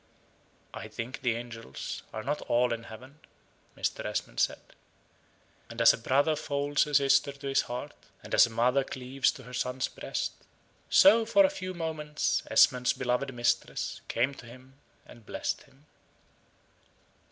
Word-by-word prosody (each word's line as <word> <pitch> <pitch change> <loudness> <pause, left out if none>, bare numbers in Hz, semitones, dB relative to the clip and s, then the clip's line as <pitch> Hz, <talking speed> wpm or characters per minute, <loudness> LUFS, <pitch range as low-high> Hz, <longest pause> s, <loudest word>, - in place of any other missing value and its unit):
"I - - -7
think 120 +3 -6
the 120 -3 +1
angels 115 - -7
are 110 - -6
not 145 +4 -2
all 120 0 +3
in 115 0 -6
heaven," 130 +7 -12 0.6
Mr. - - -2
Esmond - - -4
said. - - +2 1.1
And 115 0 -8
as 115 - +7
a - - -4
brother 140 +6 +2
folds 145 -1 0
a 150 - -2
sister 140 0 +4
to 140 0 -8
his 135 - +3
heart; 125 +4 -5 0.3
and - - -9
as - - +7
a - - -9
mother 125 +4 +2
cleaves 130 +1 -1
to 130 - -12
her 125 +1 -12
son's 125 +1 -1
breast - - -4 0.6
so 220 +4 +7
for 260 +7 +5
a 285 - +1
few 185 -10 -6
moments 155 -3 -1
Esmond's 125 -1 +4
beloved 130 +2 -1
mistress 120 -1 -1
came 130 +4 0
to 125 -3 -12
him 130 +2 -14 0.3
and 115 - -15
blessed - - -3
him. 135 +3 -25
130 Hz, 155 wpm, -29 LUFS, 120-145 Hz, 1.1 s, as